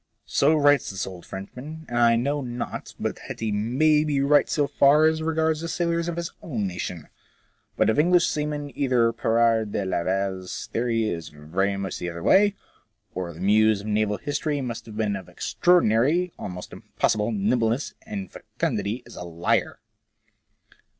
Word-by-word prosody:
So 150 +3 +3
writes 145 -1 +4
this 95 0 -3
old 90 -2 -10
Frenchfuan, 135 +12 -8
and 120 0 -1
I 115 -1 +5
know 140 +5 0
not 120 -2 -6
but - - -3
that - - -7
he 110 -1 -1
may 135 +9 +2
be 150 -2 0
right 145 +2 +4
so 145 -3 +2
far 145 +2 +4
as 160 0 +2
regards 160 -1 0
the 165 - -4
sailors 170 0 -1
of 170 - -2
his 170 0 -4
own 115 -10 -3
nation. 90 -3 -5 0.7
But - - +3
of 110 - +2
English 175 +2 +4
seamen 150 -2 -3
either 125 -4 +2
Pirard 115 -2 +2
de 100 - -1
Laval's 95 +1 -2
theory 115 -1 0
is 85 -6 -4
very 90 +7 -2
much 95 -2 -4
the 90 - -3
other 85 0 -7
way, 205 +1 +5 0.6
or 90 -1 -4
the 85 +1 -11
muse 105 +1 +4
of - - -11
naval 105 -1 +1
history 145 0 -2
must 115 -4 -6
be 110 - +1
of 95 -3 -8
extraordinary, 170 +1 +2
almost 90 -2 -7
impossible, 105 +1 -1
nimbleness 115 +5 0
and 205 -3 -6
fecundity 115 -6 -3
as - - -13
a - - -6
liar. 85 0 -1
115 Hz, 165 wpm, -25 LUFS, 100-150 Hz, 0.7 s, I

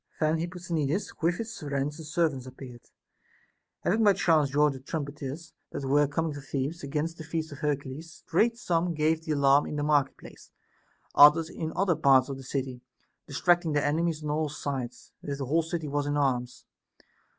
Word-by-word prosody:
Then 155 +1 +2
Ilipposthenides 170 0 -2
with 170 +2 +2
his 225 0 -5
friends 145 0 -3
and 160 - -8
servants 155 -6 0
appeared, 125 -2 -11 0.9
having 220 +5 +2
by 205 -2 +6
chance 160 -6 +3
joined 145 +1 +3
the 135 - -8
trumpeters 145 +2 -6 0.2
that 140 - -4
were 145 +2 +4
coming 160 +2 -1
to 145 - -7
Thebes, 140 +4 -3
against 150 +4 -3
the - - -6
feast 160 0 -4
of 140 - -9
Hercules. 150 +2 -4
Straight 225 +8 +2
some 170 -5 0
gave 155 +1 +1
the 155 - -1
alarm 140 0 +4
in - - -5
the 145 - -1
market 145 -2 +2
place, - - -14 0.6
others 155 +3 +7
in 160 -1 -4
other 185 -3 +2
parts 135 -2 +4
of 135 - -4
the 135 - -10
city, 130 -1 -4 0.5
distract 175 +5 +2
ing 160 -3 -2
their 145 -1 +1
enemies 155 +1 0
on 150 - -2
all 155 0 0
sides, 135 -4 -5
as 145 - -4
if - - -5
the 135 - -3
whole 160 +6 +2
city 165 -1 -4
was 145 0 -1
in 145 0 0
arms. 125 -3 -1
150 Hz, 190 wpm, -28 LUFS, 140-165 Hz, 0.9 s, others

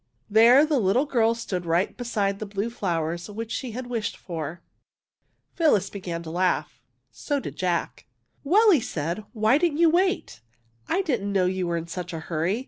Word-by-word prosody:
There 235 +7 +7
the 300 -3 +1
little 230 +7 +2
girl 230 -5 +2
stood 195 -6 -4
right 170 +3 0
beside 205 -5 -1
the 215 - -5
blue 200 +3 -3
flowers 170 -4 -2
which 225 +2 -6
she 250 -5 -4
had 255 +2 -5
wished 235 -4 -3
for. 170 -1 -6 0.9
Phyllis 290 - +2
began 175 -4 -5
to 160 - -7
laugh. 180 +2 -1 0.3
So 290 -1 -2
did - - -7
Jack. 180 -2 -2 0.2
'' - - -43
Well," 415 +9 +5
said 170 -7 -3
he, - - -10
" - - -44
why 220 +5 +3
didn't 335 -3 +1
you 330 -1 +5
wait? 370 - 0 0.5
I 390 - +1
didn't 225 - -1
know 190 -2 +2
you 185 0 -1
were 170 0 -1
in 165 - -4
such 180 0 -6
a 165 - -4
hurry. 165 +6 -1
205 Hz, 190 wpm, -25 LUFS, 175-250 Hz, 0.9 s, There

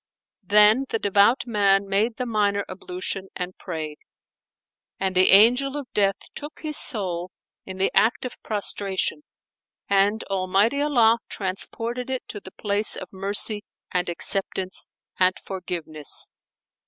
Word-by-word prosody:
Then 210 +6 +5
the - - 0
devout 205 +4 +3
man 200 -4 +2
made 215 +4 0
the 250 - -2
minor 205 -3 0
ablution[FN#455] 185 +1 -5
and 180 0 -5
prayed: 155 -4 -6 1.0
and 190 -1 -1
the 185 0 +5
Angel 250 +8 +5
of 280 -3 -8
Death 195 -1 +2 0.2
took 295 +1 -9
his 305 -1 -2
soul 185 -10 +1 0.4
in 190 0 -7
the 190 - +1
act 230 +3 +3
of 250 - -8
prostration 200 +2 -2 0.7
and 200 +2 +2
Almighty 195 +7 +1
Allah 235 -6 +4
transported 230 +6 -4
it 260 -1 -4
to 205 - -6
the 190 - -11
place 205 +1 +1
of 185 - -9
mercy 205 +2 +2 0.3
and 180 -1 0
acceptance 190 +1 0 0.3
and 185 0 +4
forgiveness. 165 -5 -3
200 Hz, 130 wpm, -24 LUFS, 190-225 Hz, 1.0 s, Then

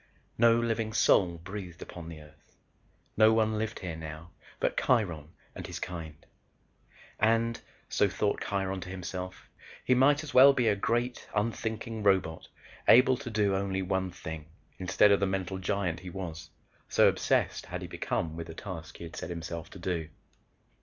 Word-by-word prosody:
No 115 0 +6
living 115 -2 -1
soul 90 -5 +4
breathed 90 0 -8
upon 85 -2 -9
the 80 -2 -9
Earth. 75 +1 -20 0.6
No 110 +1 +6
one 110 -1 +2
lived 110 +1 -3
here 90 -4 -4
now, 80 +1 -8 0.3
but - - 0
Kiron 85 - +1 0.2
and - - -7
his - - -6
kind. 80 -4 -7 0.9
"And," 115 +1 +2 0.3
so 100 - +2
thought 100 +2 -1
Kiron 95 -1 -2
to 90 - -7
himself, 90 0 -6 0.4
"he 125 - +4
might 140 +4 +4
as 155 - -8
well 135 +2 +9
be 125 -4 +1
a 105 - +4
great 120 +4 -1
unthinking 110 +1 -2
robot 95 -5 +1 0.4
able 130 +2 +7
to 130 -2 -7
do 105 -3 +1
only 95 0 -1
one 95 0 -1
thing 80 -3 -7 0.3
instead 95 +2 +4
of 100 - +5
the 100 - +1
mental 95 0 -2
giant 90 -3 -1
he 90 0 -8
was, 85 -3 -6 0.4
so - - +5
obsessed - - +1
had - - -5
he - - -5
become 80 -2 -2
with 85 0 -6
the 80 - -9
task 85 -5 -7
he - - -9
had 85 -1 -8
set - - -5
himself 85 -1 -5
to - - -11
do." 85 -3 -3
95 Hz, 170 wpm, -30 LUFS, 85-110 Hz, 0.9 s, well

